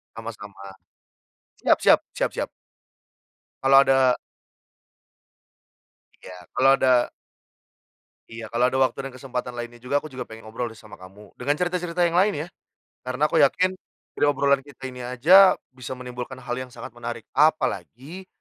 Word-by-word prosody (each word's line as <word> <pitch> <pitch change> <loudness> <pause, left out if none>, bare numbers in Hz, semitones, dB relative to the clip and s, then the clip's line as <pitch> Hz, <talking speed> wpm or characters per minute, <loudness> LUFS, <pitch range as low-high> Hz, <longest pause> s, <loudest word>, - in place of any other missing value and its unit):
Sama-sama, 105 -3 -9 0.9
siap - - +3
siap - - +6
siap - - 0
siap. - - -3 1.1
Kalau 135 0 +6
ada 130 -2 +4 2.0
Iya, 90 - -11 0.2
kalau 135 - +4
ada 125 -2 +3 1.2
Iya, 115 0 -8
kalau 120 +2 +2
ada 130 - -2
waktu 130 -1 +2
dan - - -10
kesempatan 125 -2 -5
lainnya 120 0 -7
juga, 135 +3 0
aku 155 - -4
juga 125 -2 -7
pengen 110 0 -12
ngobrol 115 +2 -4
deh 110 - -14
sama 110 -1 -15
kamu, 95 +3 -15
dengan 145 +4 0
cerita-cerita 180 -1 -2
yang 170 +1 0
lain 200 +3 +4
ya. - - -13 0.6
Karena 130 +4 0
aku - - 0
yakin 185 +6 +3 0.4
dari - - +1
obrolan 140 -1 +2
kita 135 -1 -10
ini 125 0 -9
aja, 155 +11 +6 0.2
bisa 130 0 -7
menimbulkan 125 +1 -7
hal 120 -1 -4
yang 130 -1 -7
sangat - - -9
menarik, 120 -1 -6
apalagi 155 +2 0
130 Hz, 145 wpm, -24 LUFS, 120-145 Hz, 2.0 s, siap